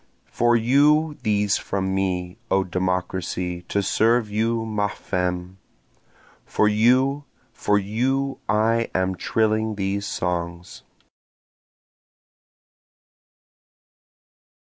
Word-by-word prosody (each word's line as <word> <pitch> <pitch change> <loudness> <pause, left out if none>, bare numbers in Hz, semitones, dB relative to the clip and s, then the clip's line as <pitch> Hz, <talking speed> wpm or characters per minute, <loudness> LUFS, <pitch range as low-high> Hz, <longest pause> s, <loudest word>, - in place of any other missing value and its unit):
For 120 0 +3
you 145 +6 +3
these 105 -1 +1
from 95 -1 -2
me, 95 0 -2
O 95 0 +2
Democracy, 90 -1 -2
to 100 - 0
serve 115 +1 +2
you 115 +2 0
ma 105 -2 0
femme! 90 -1 -3 0.8
For 105 - +1
you, 130 +7 +3 0.3
for 105 - +1
you 130 +7 -1
I 115 +2 +2
am 95 0 +1
trilling 110 +3 0
these 100 0 -2
songs. 85 0 -4
105 Hz, 85 wpm, -23 LUFS, 95-115 Hz, 0.8 s, For